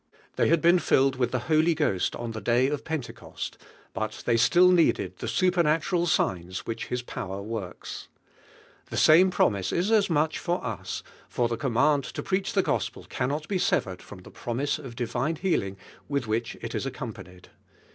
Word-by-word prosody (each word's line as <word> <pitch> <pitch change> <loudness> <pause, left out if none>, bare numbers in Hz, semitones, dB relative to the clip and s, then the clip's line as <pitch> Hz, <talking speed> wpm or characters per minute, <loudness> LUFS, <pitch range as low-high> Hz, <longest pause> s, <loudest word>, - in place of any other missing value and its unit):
They - - +2
had 165 0 +3
been 175 +2 +6
filled 135 -4 +3
with 125 -2 0
(he 130 - 0
Holy 160 +6 +2
Ghost 145 - 0
on 120 -1 -5
the 110 -1 -6
day 120 +2 +3
of 145 -1 -3
Pentecost, 160 -6 -6 0.3
but 110 0 -4
they 120 - +2
gtiU 170 +11 +5
needed 170 -2 +2
the - - -5
supernatural 175 -1 +2
signs 90 - -1
whirl. 115 - -2
Tils 120 +2 -4
power 95 -3 -5
works. 105 -3 -6 0.8
The - - -4
same 175 +5 +6
prom 110 - +2
ise 95 -1 -3
is 185 +6 0
as 210 -3 +4
much 155 -1 +1
for 175 -3 -2
us, 110 -6 -4 0.3
for 120 - +1
the 115 - -2
command 140 +4 +2
to - - -3
preach 190 0 -1
the - - +3
Gospel - - -2
cannot 145 +5 -2
he 190 - +1
severed 95 - 0
from 95 -3 -12
the - - -13
promise 125 +5 -2
of 130 -5 -9
divine 125 +6 -1
healing 125 - -1 0.3
with 140 -3 -1
which 110 +1 -2
it - - -5
is - - -2
accompanied. 90 0 -8
135 Hz, 180 wpm, -27 LUFS, 115-165 Hz, 0.8 s, been